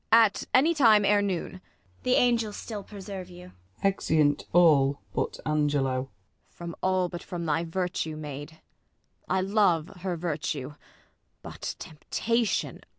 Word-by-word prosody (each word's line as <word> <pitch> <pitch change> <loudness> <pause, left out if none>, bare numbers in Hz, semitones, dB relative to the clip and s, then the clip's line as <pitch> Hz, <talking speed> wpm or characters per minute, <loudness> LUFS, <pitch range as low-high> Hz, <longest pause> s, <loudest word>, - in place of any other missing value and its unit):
At 225 -3 +5
any 300 +6 +5
time 225 -9 +5
ere 205 0 +4
noon. 190 -4 -2
ISAB. - - -19 0.4
The 250 - +2
angels 230 -4 +2
still 215 -3 -6
preserve 195 -2 -8
you! 180 0 -12 0.3
[Exennt 155 -7 +2
all 145 -5 +5
hut - - -2
Angelo. 145 -3 +1
Ang. 130 - -5 0.4
From 170 -1 -8
all, 185 -1 +2
but 175 0 -7
from 170 -2 -5
thy 160 +1 +1
virtue, 170 -2 -2
maid! 150 +1 -8 0.7
I 190 0 +2
love 190 -4 +2
her 180 -1 -3
virtue. 150 -4 -3 0.7
But, - - -6
temptation 225 +8 -2
180 Hz, 135 wpm, -27 LUFS, 155-205 Hz, 0.7 s, At